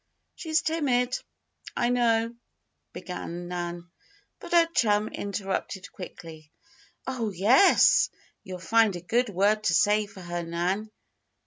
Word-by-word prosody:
"She's 320 -1 -1
timid, 255 -6 0 0.6
I 240 - +1
know," 230 -2 +2 0.6
began 175 -1 -7
Nan, 175 -1 -5 0.5
but - - -10
her 340 -1 +6
chum 210 -1 +2
interrupted 195 -2 -4
quickly: 160 -4 -11 0.5
"Oh, 245 -4 -2
yes! 220 - +5 0.3
You'll 185 -1 -7
find 215 +3 +2
a 175 - -6
good 235 +7 0
word 205 +3 +1
to 165 - +3
say 210 +3 +3
for 200 -2 -13
her, 175 0 -4
Nan. 175 +5 -2
205 Hz, 120 wpm, -27 LUFS, 175-235 Hz, 0.6 s, her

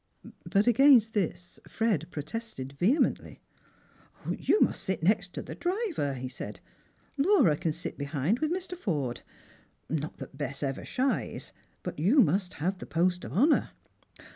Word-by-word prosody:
But 200 +1 +3
against 240 -2 +6
this 180 -3 -2
Fred 210 -9 0
protested 150 - -6
vehemently. 205 - +1 0.9
"You 425 - +1
must - - +2
sit 190 -3 -2
next 195 0 +2
the - - -5
driver," 355 - -1
he 130 0 -5
said; 130 - -7 0.6
"La^ara 275 - +4
din 170 -2 0
sit 165 0 -6
behind 145 - 0
with 310 +2 0
Mr. 365 0 -3
Forde. 145 - -2 0.7
Not 155 0 -3
that - - -9
Bess 140 -1 -4
ever 135 -1 -2
shies, 265 +1 -2 0.3
but - - -5
you 205 - +4
must 190 0 +1
have 185 +5 -2
the - - -8
post 180 +2 +1
of - - -7
honour." 285 - +3
185 Hz, 140 wpm, -29 LUFS, 150-245 Hz, 0.9 s, against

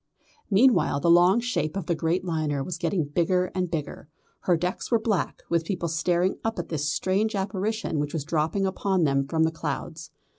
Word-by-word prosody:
Meanwhile 215 - +4
the 170 - +4
long 175 +5 +6
shape 175 -8 -2
of 190 - -3
the 170 - 0
great 165 +3 -1
liner 155 -5 -1
was 170 +2 -5
getting 170 -4 0
bigger 180 +5 0
and 185 -2 -1
bigger. 155 -2 -5 0.3
Her 175 -2 +2
decks 180 +3 -3
were 235 - +4
black, 220 -4 -2
with 170 -1 +1
people 175 0 -2
staring 175 +3 0
up 225 0 -2
at - - -4
this 150 -2 -1
strange 200 +6 0
apparition 195 -2 -2
which 145 0 -2
was 155 - -2
dropping 160 +5 0
upon 190 -1 0
them 140 -2 +1
from 160 +2 +1
the 160 - +2
clouds. 160 0 -5
175 Hz, 190 wpm, -26 LUFS, 160-190 Hz, 0.3 s, long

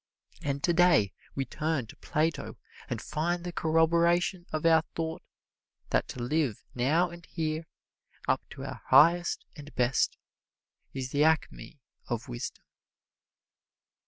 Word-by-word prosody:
And 140 0 -2
today 170 - +4 0.2
we 135 - -1
turn 150 0 -1
to 110 - -13
Plato 160 +2 -1 0.3
and - - -2
find 170 +3 -2
the 175 -1 -5
corroboration 170 +3 +2
of 155 +1 -2
our 160 -1 +6
thought 160 0 -3 0.7
that - - +2
to 125 - -6
live 135 -3 0
now 155 +8 +2
and 170 0 -11
here, 160 -1 -3 0.6
up - - +2
to - - -8
our - - -7
highest 170 +2 +5
and 150 0 -10
best, 125 +1 +2 0.7
is 130 -1 -5
the 145 +1 +3
acme 160 -2 0 0.3
of 120 +3 -3
wisdom. 120 -1 -6
160 Hz, 130 wpm, -29 LUFS, 135-170 Hz, 0.7 s, our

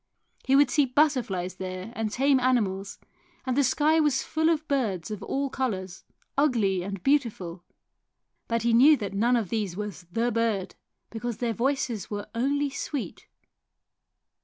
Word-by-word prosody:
He 265 - +3
would 280 -1 +5
see 290 -3 +3
butterflies 245 - +1
there 185 +3 -6
and 220 -1 -2
tame 270 +2 +3
animals, 205 -7 0 0.5
and 255 -2 0
the 285 - +3
sky 305 +5 +3
was 295 -4 +2
full 315 +1 +1
of 320 -1 0
birds 215 - -1
of 210 -1 -5
all 275 +7 -1
colours, 190 -8 -3 0.3
ugly 230 -10 +2
and 195 0 -6
beautiful; 205 -11 0 0.8
but 230 -1 -1
he 235 0 +2
knew 285 +6 +7
that 200 -4 -5
none 235 +5 +2
of 220 -6 -1
these 205 -5 -2
was 200 -5 -6
the 230 +5 0
bird, 225 -5 -1 0.4
because 235 0 -4
their 235 -2 -1
voices 245 -3 -1
were 205 -1 -4
only 280 +4 0
sweet. 280 -1 -5
235 Hz, 155 wpm, -27 LUFS, 195-275 Hz, 0.8 s, knew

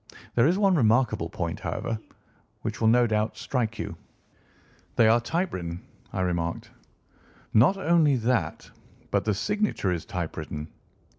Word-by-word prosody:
There 120 +3 +4
is 175 +3 +2
one 200 -2 +4
remarkable 115 - +2
point, 85 -1 -3
however, 115 -1 -3 0.6
which - - -4
will 110 - +4
no 120 +2 +5
doubt 110 -1 0
strike 115 -4 -2
you." - - -4 1.0
"They 115 - +5
are 115 +2 +5
typewritten," 95 - -2 0.3
I 95 - -2
remarked. 85 -2 -2 0.8
"Not 130 - +5
only 165 -6 +4
that, 115 -9 -1 0.4
but - - +1
the 105 -2 +1
signature 205 - 0
is 85 -3 -2
typewritten. 80 -3 -5
110 Hz, 135 wpm, -27 LUFS, 90-135 Hz, 1.0 s, no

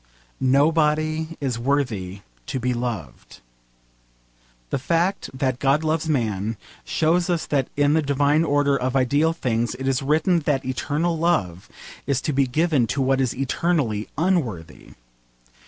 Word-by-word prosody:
Nobody 155 +3 +1
is 130 -5 -2
worthy 115 -8 -1 0.3
to 130 - -3
be 125 +1 0
loved. 115 - -5 1.3
The - - 0
fact 170 +7 0
that 130 -1 -2
God 140 +3 +2
loves 160 0 -1
man 110 -6 -1 0.3
shows 170 +3 +1
us 170 -2 0
that 135 -3 0
in 145 0 +3
the 160 - +3
divine 145 +2 +2
order 145 -2 +2
of 130 -1 -2
ideal 145 +5 +2
things 120 -7 -1
it 135 +1 -5
is 135 -1 +1
written 160 +5 +2
that 145 -4 -1
eternal 150 +6 -1
love 95 - 0 0.4
is 140 -2 +1
to 150 - -2
be 135 0 +2
given 150 -2 +1
to 140 - -2
what 135 0 +2
is 130 -3 0
eternally 135 -5 -1
unworthy. 135 - -2
140 Hz, 140 wpm, -23 LUFS, 125-155 Hz, 1.3 s, in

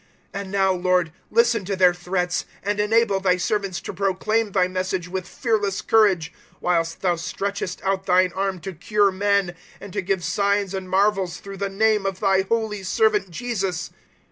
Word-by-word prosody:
004:029 200 - -3
And 190 -1 -8
now, 195 -1 +3
Lord, 180 -2 +1 0.2
listen 235 -1 +3
to 200 +1 -2
their 180 -1 +5
threats, 180 0 -2 0.2
and 205 +1 -1
enable 210 -1 +3
Thy 185 -1 +2
servants 195 -1 -1
to - - -6
proclaim 200 +3 0
Thy 185 -2 +2
Message 185 -1 -2
with 185 0 -4
fearless 205 -5 -1
courage, 190 -8 +3 0.2
004:030 - - -30
whilst 165 -2 0
Thou 180 -2 +2
stretchest 190 +2 -4
out 195 0 -1
Thine 180 -1 +3
arm 195 -1 -2
to 190 +3 -6
cure 200 +4 +2
men, 200 -1 +1 0.3
and 200 -2 -10
to 200 - -1
give 190 -1 -1
signs 200 +1 0
and 190 -1 -5
marvels 195 -2 +1
through 195 0 -9
the 200 +1 -2
name 210 0 +2
of 190 -1 -3
Thy 195 -2 +3
holy 220 -3 -1
Servant 420 - +1
Jesus." 195 -3 -3
195 Hz, 180 wpm, -23 LUFS, 185-205 Hz, 0.3 s, their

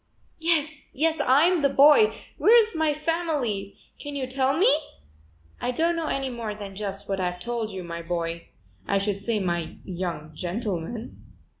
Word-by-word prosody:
"Yes, 315 -2 0
yes, 320 +3 +1
I'm 315 +7 +4
the 280 - +4
boy. 295 +10 +6 0.3
Where's 450 -2 +5
my 315 -1 +2
family? 295 - -2 0.2
Can 290 -1 -6
you 270 -2 -2
tell 260 +1 0
me?" 420 +8 +5 0.9
"I - - -1
don't 330 +7 +1
know 330 -2 -2
any 270 -2 -1
more 230 -3 -4
than 200 -2 -8
just 200 0 -5
what 195 -1 -2
I've 180 -1 -2
told 230 +2 -3
you, 190 -3 -6
my 170 0 -6
boy; 170 0 -3 0.4
I 200 - +2
should 200 0 -1
say 225 +2 0
my 175 -4 -2
young 170 -4 -4
gentleman." 195 +4 -4
235 Hz, 160 wpm, -26 LUFS, 190-305 Hz, 0.9 s, boy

